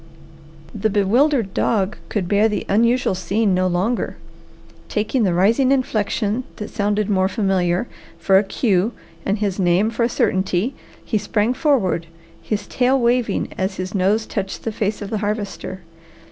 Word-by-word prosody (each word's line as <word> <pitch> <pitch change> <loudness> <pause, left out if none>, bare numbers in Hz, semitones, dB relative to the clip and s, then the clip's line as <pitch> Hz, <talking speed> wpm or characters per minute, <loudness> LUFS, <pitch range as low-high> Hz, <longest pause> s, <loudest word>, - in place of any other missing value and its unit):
The 215 0 0
bewildered 220 +2 +2
dog 205 -2 +1
could 195 -5 -2
bear 205 +3 +3
the 210 - -2
unusual 235 +3 +2
scene 195 +2 0
no 185 0 +2
longer. 185 +7 -1 0.7
Taking 220 +4 0
the 190 -5 +2
rising 230 +9 +3
inflection, 225 -3 0
that 210 - -7
sounded 205 -1 0
more 190 -2 +2
familiar, 190 -1 0 0.3
for 190 -1 +4
a - - 0
cue, 205 +1 +1 0.3
and 200 +2 +1
his 200 -2 -2
name 185 +4 +2
for 230 - -4
a 235 - +3
certainty, 190 +2 0 0.3
he 215 - 0
sprang 210 +3 0
forward, 230 - +1 0.3
his 205 -2 -3
tail 260 +2 +2
waving 240 -3 +1
as 190 +1 -1
his 185 +1 -4
nose 205 +3 +2
touched 195 -1 -4
the 225 - -2
face 210 0 -2
of 200 - -7
the 215 - -1
Harvester. 205 -3 -4
205 Hz, 155 wpm, -21 LUFS, 190-230 Hz, 0.7 s, for